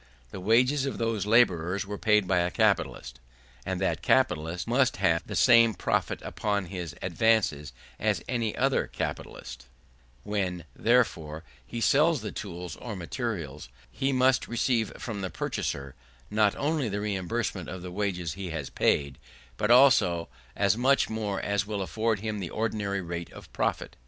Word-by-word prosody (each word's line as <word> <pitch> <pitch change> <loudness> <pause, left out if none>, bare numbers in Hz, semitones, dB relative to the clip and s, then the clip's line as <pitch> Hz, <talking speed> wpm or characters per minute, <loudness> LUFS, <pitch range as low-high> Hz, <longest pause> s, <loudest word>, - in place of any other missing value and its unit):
The - - -7
wages 125 +8 +3
of - - -3
those 115 -3 -1
labourers 100 -5 +3
were 105 0 -6
paid 105 -3 +3
by 90 -1 +3
a 85 0 +1
capitalist, 65 -6 0 0.5
and 95 -1 -2
that 95 - 0
capitalist 90 -10 +1
must 130 +1 +2
have 90 -4 +1
the - - -5
same 115 -3 +6
profit - - -1
upon 100 -3 -2
his 85 -5 -5
advances 90 -5 +1 0.3
as - - 0
any 115 -3 -1
other - - +1
capitalist; - - -6 0.6
when, 95 -5 -2
therefore, 90 -10 +1 0.2
he 120 - -6
sells 150 +5 +3
the - - -5
tools 90 -5 -6
or 115 -4 -6
materials, 85 - -5 0.2
he 135 +1 -1
must 130 0 +3
receive 120 -1 0
from 105 -4 -5
the 95 - -3
purchaser 70 -6 -3 0.4
not 105 -1 +3
only 145 -4 0
the 100 +1 -2
reimbursement 100 -1 -2
of 95 -1 -7
the 90 - -6
wages 90 -4 -2
he 95 +1 -6
has 80 -4 -5
paid, 70 -3 +1 0.4
but 105 - -1
also 110 - +5 0.3
as 100 0 +3
much 130 +1 +2
more 105 -3 -2
as 100 0 -1
will 105 -2 -2
afford 110 +1 -1
him 110 -1 -3
the 90 -4 -4
ordinary 105 -3 -2
rate 85 -1 -5
of - - -13
profit. - - -2
100 Hz, 155 wpm, -28 LUFS, 90-115 Hz, 0.6 s, same